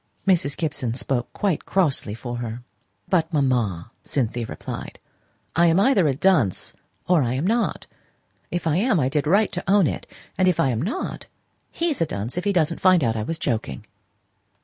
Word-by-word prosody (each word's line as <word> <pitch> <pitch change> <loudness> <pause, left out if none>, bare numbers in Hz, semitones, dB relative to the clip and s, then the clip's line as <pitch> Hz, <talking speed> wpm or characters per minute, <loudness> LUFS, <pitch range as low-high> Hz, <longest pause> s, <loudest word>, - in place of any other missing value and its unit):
Mrs. 160 -7 +2
Gibson 140 -8 -2
spoke 125 0 -2
quite 195 -7 -1
crossly 150 - +1
for 120 +1 -5
her. 120 0 -5 0.4
"But, 175 -3 +1
mamma," 120 - 0
Cynthia 120 -3 -2
replied, - - -7 0.6
"I 170 +1 +5
am 165 +2 +4
either 200 - +4
a 135 - +1
dunce, 145 - +2 0.3
or 175 -3 +4
I 125 -1 0
am 140 +6 -1
not. 230 +4 0 0.6
If 175 -1 -3
I 160 0 +2
am, 210 -2 +2
I 130 -2 +1
did 150 +1 -1
right 200 +6 +3
to 180 - -4
own 200 -3 +5
it; - - -3 0.3
if 185 -3 +3
I 155 -5 +3
am 115 -1 -1
not, 230 - -4 0.4
he's 330 - -1
a 165 - +2
dunce 110 -1 -4
if 180 - -3
he 205 - +3
doesn't 170 -3 +1
find 185 -4 +5
out 115 -2 +1
I 110 - -1
was 160 +10 -3
joking." 110 - -3
155 Hz, 180 wpm, -23 LUFS, 120-185 Hz, 0.6 s, I